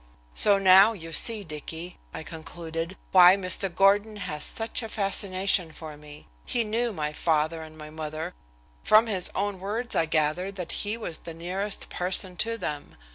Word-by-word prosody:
"So 200 - +4
now 195 +3 +7
you 165 -5 -9
see, 220 +2 +2
Dicky," 160 +2 -8
I - - -7
concluded, 165 +2 -6
"why 180 0 +8
Mr. 195 0 -2
Gordon 200 +4 +3
has 150 -7 -4
such 225 +2 -2
a 225 - -6
fascination 195 -3 0
for 155 -1 -9
me. 150 0 -13 0.2
He 235 - -1
knew 230 +2 -1
my 150 -6 -3
father 160 +1 0
and 155 0 -11
my 150 0 -10
mother 155 +2 -5 0.5
from 215 +2 +6
his 195 -5 +1
own 200 -1 -1
words 220 +6 -3
I 165 - +1
gather 155 +4 0
that 180 -4 -6
he 210 +2 -1
was 195 -8 -5
the 165 - -9
nearest 190 +5 -3
person 180 +1 0
to 230 +4 -1
them. 150 -9 -5
180 Hz, 170 wpm, -27 LUFS, 160-205 Hz, 0.5 s, why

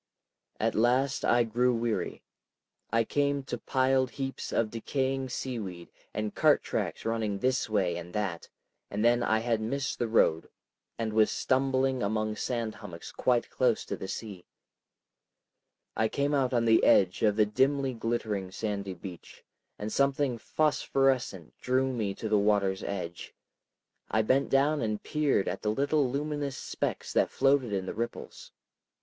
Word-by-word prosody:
At - - +1
last 125 +5 +2
I 120 0 +4
grew 120 +2 +1
weary. 115 -1 -2 0.7
I 115 +1 +3
came 140 +2 0
to 135 - -4
piled 130 0 +2
heaps 135 0 -5
of 110 -2 0
decaying 130 +3 -2
seaweed 105 -10 -5 0.2
and 105 0 -3
cart - - +4
tracks - - -3
running 110 -3 -1
this 130 +2 0
way 95 -5 +1
and 85 0 -8
that, 100 -6 -3 0.4
and 105 +3 -1
then 120 0 +4
I 110 -2 +2
had 115 -1 0
missed 135 +5 -2
the 120 - 0
road 80 -7 +2 0.5
and 110 -2 -2
was 110 0 +4
stumbling 130 -1 +1
among 110 +1 -1
sand 115 -3 -2
hummocks 100 -6 -9
quite 125 -2 +1
close 125 -3 +1
to - - -3
the 95 - -7
sea. 100 -4 -7 1.5
I 110 - +2
came 140 +5 -1
out 135 -3 +2
on 120 -2 +2
the 115 0 +5
edge 95 -2 +4
of 105 -2 +3
the 105 0 +4
dimly 135 +5 +1
glittering 110 -4 -2
sandy 100 -1 -4
beach, 90 0 -11 0.3
and 105 +1 -4
something 140 -3 +1
phosphorescent 135 - 0
drew 130 +1 +1
me 105 -5 -2
to 110 - -4
the 105 -1 +3
water's 100 -2 +2
edge. 90 -3 -5 0.7
I 110 0 +2
bent 130 +5 +2
down 145 +2 +3
and 110 -2 -2
peered 150 -9 +1
at 90 - -3
the 105 - -1
little 140 +4 +1
luminous 145 0 -2
specks - - -3
that - - +3
floated 135 -4 +2
in 95 -2 -1
the - - -4
ripples. 115 +2 -6
115 Hz, 155 wpm, -29 LUFS, 105-135 Hz, 1.5 s, the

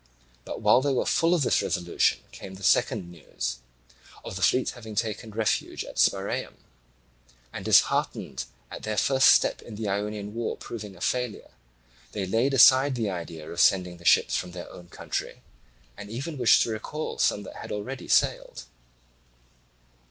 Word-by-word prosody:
But - - -6
while 125 - +5
they 140 0 0
were 130 - 0
full 165 +2 +2
of 160 - +1
this - - +2
resolution 85 0 0
came 95 - -10
the 95 - -12
second 85 -1 +2
news 75 -7 -5 0.7
of - - -6
the 95 - -5
fleet 125 +7 +2
having 110 -3 -10
taken 110 +1 -2
refuge 110 0 -1
in - - -10
Spiraeum; - - 0 1.0
and - - -6
disheartened 65 - +2 0.3
at - - -7
their 110 -1 -3
first 130 +5 +4
step - - +4
in 115 - -10
the 110 0 -4
Ionian 105 +1 -3
war 115 0 -3
proving 105 -4 -8
a 85 - -16
failure, 125 -3 -2 0.6
they 100 -2 -2
laid 115 +8 +1
aside 130 +1 +6
the 110 -4 -1
idea 85 -3 -7
of 85 - -6
sending 90 -1 +3
the 85 - -17
ships - - +4
from 90 - -3
their 90 -1 -8
own 90 - -12
country, - - -5 0.5
and 105 - -10
even 140 +6 -5
wished 120 - +5
to 115 - -3
recall 150 +8 -5
some 105 - +1
that - - -10
had - - -8
already 120 +6 -5
sailed. - - +1
105 Hz, 165 wpm, -26 LUFS, 95-125 Hz, 1.0 s, aside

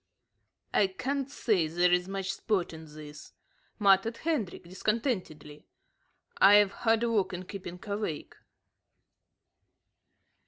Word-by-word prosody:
"I 200 - +4
can't 265 +7 -3
say 210 - +1
there's 180 +2 +2
much 195 0 -3
sport 195 -4 -1
in 160 0 -10
this," 150 0 -11 0.4
muttered 200 +2 +3
Hendrik, 290 - -2
discontentedly. 180 - -3 0.7
"I've 205 0 +7
hard 225 +2 +1
work 220 -5 +1
in 180 0 -5
keeping 180 -2 -8
awake." 205 -7 -4
195 Hz, 95 wpm, -29 LUFS, 175-225 Hz, 0.7 s, I've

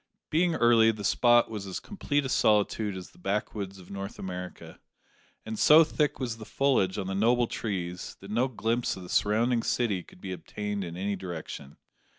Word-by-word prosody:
Being 170 +1 +2
early, 115 -1 +5
the 105 -2 -8
spot 120 +3 +4
was 105 -3 -5
as 95 - -4
complete 145 -8 -2
a - - -2
solitude 105 -3 +2
as 90 - -9
the - - -22
backwoods 100 0 -3
of 90 - -14
North 100 0 -6
America, 90 -1 -7 0.7
and 110 -1 -5
so 155 +2 +8
thick 150 -1 -1
was 120 -4 -3
the 110 - -9
foliage 110 -7 +1
on 100 - -2
the 95 - -3
noble 120 +5 +3
trees, 90 -6 -4
that 100 +1 -10
no 120 +4 +2
glimpse 115 -2 -1
of 95 - -8
the 90 - -10
surrounding 115 +3 +2
city 110 -6 0
could 90 - -18
be 95 0 -6
obtained 100 +3 -4
in 85 -1 -6
any 100 +2 -1
direction. 85 -6 -7
105 Hz, 185 wpm, -28 LUFS, 95-120 Hz, 0.7 s, so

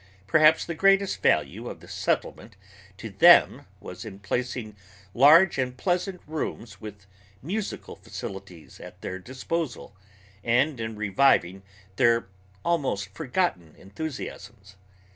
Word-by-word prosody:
Perhaps 155 +10 +4
the 170 - -4
greatest 195 +3 +2
value 75 -3 +1
of - - -9
the - - -16
Settlement - - -3 0.4
to - - -8
them - - +5
was - - -9
in 105 -3 -9
placing 110 +2 -4 0.4
large 155 +6 +6
and 125 -1 -2
pleasant 180 +3 -2
rooms 120 -9 -6
with 105 -2 -10 0.4
musical 200 +7 -5
facilities 95 -4 -10
at - - -12
their 95 - -5
disposal, 130 - -5 0.5
and 125 +4 +1
in 110 -1 -4
reviving 100 -3 +2 0.4
their 115 -4 +3 0.4
almost 130 - -1
forgotten 125 - -2
enthusiams. 100 -4 -8
120 Hz, 115 wpm, -26 LUFS, 100-160 Hz, 0.5 s, large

